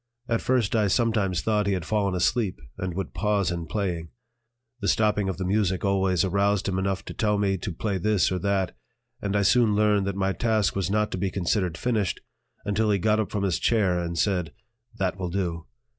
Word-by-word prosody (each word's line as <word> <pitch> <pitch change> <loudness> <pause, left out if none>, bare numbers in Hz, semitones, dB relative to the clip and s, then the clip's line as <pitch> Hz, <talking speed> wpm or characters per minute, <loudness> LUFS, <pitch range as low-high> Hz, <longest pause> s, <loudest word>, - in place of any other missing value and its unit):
At 115 -2 0
first 125 -5 +1
I 105 -2 +3
sometimes 100 -4 +1
thought 105 -2 +1
he 100 - +2
had 90 -4 -2
fallen 100 -3 0
asleep 95 +2 0 0.2
and 90 -2 -4
would 95 -2 -4
pause 100 -4 +1
in 85 -2 -4
playing. 85 -2 -2 0.7
The 100 - -3
stopping 105 -2 +2
of 95 - -3
the 95 - -3
music 95 -1 +1
always 95 -3 +2
aroused 100 +1 +1
him 95 -1 0
enough 95 0 -2
to - - -7
tell 105 -2 +1
me 100 -1 +1
to 95 - -4
play 95 +3 -2
this 105 +1 +2
or 90 - -1
that; 100 -2 0 0.5
and 100 0 -2
I 100 - +3
soon 115 0 +4
learned 105 -2 +2
that 100 - -2
my 95 0 0
task 110 0 +1
was 95 -3 -1
not 105 +1 +1
to 90 - -3
be 95 +1 0
considered 90 -1 -1
finished 110 -7 0 0.5
until 105 +1 +1
he 100 - +3
got 105 +4 +2
up 105 -4 -1
from 100 -2 -2
his 95 -4 0
chair 100 -6 +2
and 85 -1 -3
said: 90 -3 0 0.5
"That 95 -1 -1
will 90 -2 -2
do." 85 -3 -3
100 Hz, 210 wpm, -26 LUFS, 90-105 Hz, 0.7 s, soon